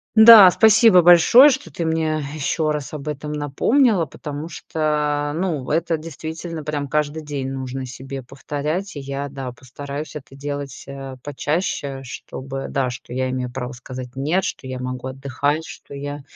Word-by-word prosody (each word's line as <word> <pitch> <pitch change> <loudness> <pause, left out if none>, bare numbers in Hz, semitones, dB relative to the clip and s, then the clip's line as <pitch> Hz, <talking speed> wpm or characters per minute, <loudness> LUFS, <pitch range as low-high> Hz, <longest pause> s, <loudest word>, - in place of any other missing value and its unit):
Да, 220 -4 +11
спасибо 220 -2 +6
большое, 175 - +8
что 250 - -4
ты 165 +4 -3
мне 160 -1 0
еще 155 +1 -1
раз 145 -4 -4
об 150 0 -7
этом 150 0 -4
напомнила, 175 - +2
потому 150 +2 -7
что, 150 -2 -1
ну 160 -7 -2
это 165 +1 +1
действительно 160 +1 -7
прям 145 -1 -3
каждый 150 +2 -1
день 140 -3 -4
нужно 130 0 -5
себе 130 +1 -8
повторять. 150 +8 -4
И - - -5
я, 140 +1 -5
да, 135 -2 -6
постараюсь 140 +4 -8
это 135 -2 -9
делать, 145 0 -6
а, 135 -1 -8
почаще, 145 -1 -2
чтобы, 130 +2 -7
да, 135 -2 0
что 120 0 -9
я 130 0 -1
имею 130 -1 -3
право 125 +1 -5
сказать 125 0 -9
нет, 155 +8 0
что - - -4
я 130 -1 -5
могу 125 0 -5
отдыхать, 140 +4 -2
что - - -11
я 145 +1 -6
145 Hz, 160 wpm, -21 LUFS, 135-160 Hz, -, Да